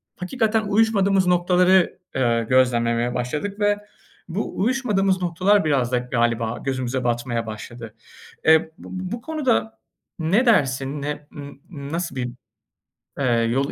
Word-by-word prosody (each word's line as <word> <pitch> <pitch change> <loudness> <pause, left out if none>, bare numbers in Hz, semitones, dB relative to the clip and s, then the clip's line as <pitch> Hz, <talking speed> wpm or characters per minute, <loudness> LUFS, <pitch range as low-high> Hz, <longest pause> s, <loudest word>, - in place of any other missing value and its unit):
hakikaten 220 +3 0
uyuşmadığımız 200 -3 +2
noktaları, 180 +1 +3 0.2
ııı, 115 -3 +1
gözlemlemeye 120 -1 +2
başladık. 150 - -3
Ve 205 0 +2 0.5
bu 195 +6 -4
uyuşmadığımız 200 -5 +1
noktalar 185 +3 +2
biraz 130 -5 +1
da 125 - +2
galiba 120 -2 -1
gözümüze 130 -1 -2
batmaya 120 -1 -1
başladı. 110 +1 -8 0.5
Eee, 160 0 +7
b - - -9 0.2
b 185 0 -5
bu 235 0 -4
konuda 115 - -1 0.4
ne 190 +11 +2
dersin, 140 - +1
ne 145 0 -5
n 140 -1 -9 0.2
nasıl 160 0 -5
bir, 125 -1 -2 0.9
ııı, 115 -3 +2
yol 135 +4 0
145 Hz, 125 wpm, -22 LUFS, 120-195 Hz, 0.9 s, Eee